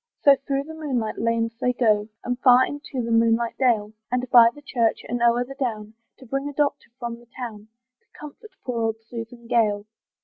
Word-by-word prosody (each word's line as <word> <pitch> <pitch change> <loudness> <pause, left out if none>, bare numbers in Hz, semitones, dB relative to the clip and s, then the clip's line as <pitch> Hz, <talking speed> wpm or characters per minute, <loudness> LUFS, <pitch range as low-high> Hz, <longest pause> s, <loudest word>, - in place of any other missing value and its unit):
So 280 -1 +8
through 275 0 -2
the 320 +2 -10
moonlight 260 -9 -3
lanes 230 0 0
they 250 0 +1
go, 215 -4 +2
And 245 0 -2
far 255 0 +6
into 285 -3 -5
the 230 - -3
moonlight 230 0 +2
dale, 220 -5 +2 0.2
And 250 0 -1
by 235 -2 +8
the 290 +5 -15
church, 235 -5 0
and 240 +1 -3
o'er 240 +1 +3
the 270 - -9
down, 220 -6 -4 0.2
To 260 - -14
bring 275 +4 -3
a - - -8
doctor 290 0 -1
from 235 -1 -5
the 240 - -20
town, 220 -4 -7 0.3
To - - -43
comfort 305 - -11 0.2
poor 240 -2 -2
old 225 -1 0
Susan 235 +1 -9
Gale. 215 -4 +1
240 Hz, 200 wpm, -24 LUFS, 230-265 Hz, 0.3 s, So